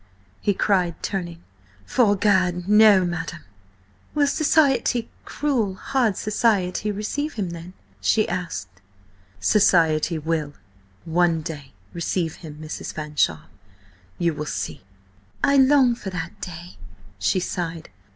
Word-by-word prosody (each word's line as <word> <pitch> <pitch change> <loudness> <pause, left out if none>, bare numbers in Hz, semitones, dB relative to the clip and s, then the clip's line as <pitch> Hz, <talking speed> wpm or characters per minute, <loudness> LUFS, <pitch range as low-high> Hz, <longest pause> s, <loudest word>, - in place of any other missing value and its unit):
he 205 - +1
cried, 185 -4 +1
turning. 175 -4 -4 0.4
"'Fore 215 -5 +3
Gad, 185 -3 +1
no, 210 -2 +6
madam!" 170 -1 -4 0.7
"Will 295 -1 +4
society–cruel, 270 - +1
hard 240 +1 0
society–receive 215 +5 0
him, 195 -6 -3
then?" 170 +2 -9 0.3
she 215 - +2
asked. 100 - -5 0.6
"Society 165 -5 +3
will–one 155 - -2
day–receive 155 - -4
him, 155 -3 -10
Mrs. 155 0 -6
Fanshawe. 150 - -1 0.7
You 170 -2 +1
will 150 0 -5
see." 80 - -4 0.6
"I 280 0 +4
long 265 -2 +5
for 210 -4 -6
that 180 +2 -6
day," 175 0 -8 0.4
she 185 - +1
sighed. 170 -2 -4
180 Hz, 100 wpm, -23 LUFS, 160-215 Hz, 0.7 s, no